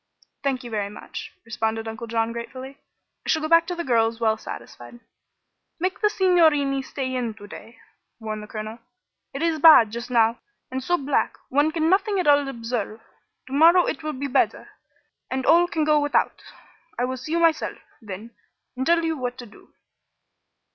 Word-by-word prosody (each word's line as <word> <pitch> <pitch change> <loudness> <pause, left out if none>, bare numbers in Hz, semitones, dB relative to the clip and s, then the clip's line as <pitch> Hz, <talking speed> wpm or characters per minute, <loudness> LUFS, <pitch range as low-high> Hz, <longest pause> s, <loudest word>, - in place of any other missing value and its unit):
"Thank 270 -2 -1
you 240 - -8
very 205 -2 -2
much," 210 - -9
responded 225 -1 -2
Uncle 225 +1 -6
John, 225 0 0
gratefully. 260 +4 -8 0.4
"I - - -7
shall 315 -1 +2
go - - 0
back 335 +1 +5
to 355 - -3
the 340 - -3
girls 230 -3 +1
well 220 -2 +2
satisfied." 240 +2 -10 0.8
"Make 370 +3 -2
the 420 - +4
signorini 315 -9 +3
stay 265 -1 -4
in 235 -4 -2
to 205 - -12
day," 225 +2 -12 0.4
warned 215 -1 -5
the 210 - -10
colonel. 215 +1 -7 0.5
"It 275 +3 -4
is 325 -2 +1
bad, 300 -9 +8
just 235 +2 -6
now, 230 -1 +3 0.3
and 260 0 -3
so 350 +6 +1
black 280 -2 -1
one 290 +4 +2
can 320 -1 0
nothing 390 +2 +2
at 360 - 0
all 285 -1 +4
observe. 230 -4 -4 0.5
To 260 - -10
morrow 335 +5 +6
it - - -3
will 305 0 -4
be 275 +1 -5
better, 275 -1 0 0.6
and 260 0 -2
all 345 +1 +5
can 320 -3 -1
go 300 0 +4
without. 290 0 0 0.6
I 245 - +1
will 260 +1 -4
see 285 +6 -6
you 340 - +2
myself, 330 -2 +1 0.2
then, 215 +2 -8 0.4
and 260 +1 -3
tell 335 0 +3
you 325 0 0
what 250 -3 -4
to 245 - -8
do." 210 - -19
260 Hz, 185 wpm, -24 LUFS, 230-315 Hz, 0.8 s, bad